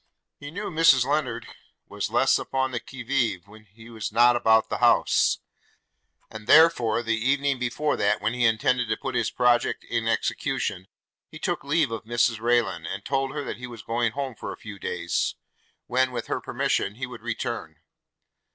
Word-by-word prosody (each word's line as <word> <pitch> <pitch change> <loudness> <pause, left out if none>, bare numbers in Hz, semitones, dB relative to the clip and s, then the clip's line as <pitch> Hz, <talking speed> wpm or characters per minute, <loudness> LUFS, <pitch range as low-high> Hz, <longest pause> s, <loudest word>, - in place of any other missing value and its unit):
He 145 - -8
knew 200 +6 -5
Mrs 155 -6 +5
Lennard 140 -4 -1 0.4
was - - -4
less - - +3
upon 130 0 -1
the 120 - -2
qui 130 +1 -10
vive? 115 -8 -1
when 110 +1 -16
he 110 +3 -16
was 110 -2 -5
not 120 +2 +5
about 110 -2 +3
the - - -3
house; - - +3 0.9
and 110 0 -9
therefore, 125 -8 +5
the 115 0 0
evening 140 +3 0
before 125 +5 -1
that 100 - +1
when 105 +2 -1
he 125 0 -1
intended 120 +2 +1
to 110 - 0
put 135 - -5
his 120 -2 0
project 120 -1 +1
in 115 -1 -2
execution, 95 -4 -1 0.4
he - - -10
took - - -2
leave 145 -2 +1
of 115 -1 -5
Mrs 120 0 +1
Rayland, 110 -8 +1
and 100 +4 -6
told 135 -1 -1
her 145 - -3
that - - -5
he 125 +1 -7
was 115 -3 -10
going 115 0 -1
home 135 -2 -3
for - - -7
a - - -8
few 105 -2 -10
days, 85 -2 -2 0.5
when 130 +1 +1
with 125 - -4
her - - -3
permission 100 - -1
he 130 +3 -4
would 120 -2 -10
return. 115 -7 -4
120 Hz, 185 wpm, -25 LUFS, 110-130 Hz, 0.9 s, Mrs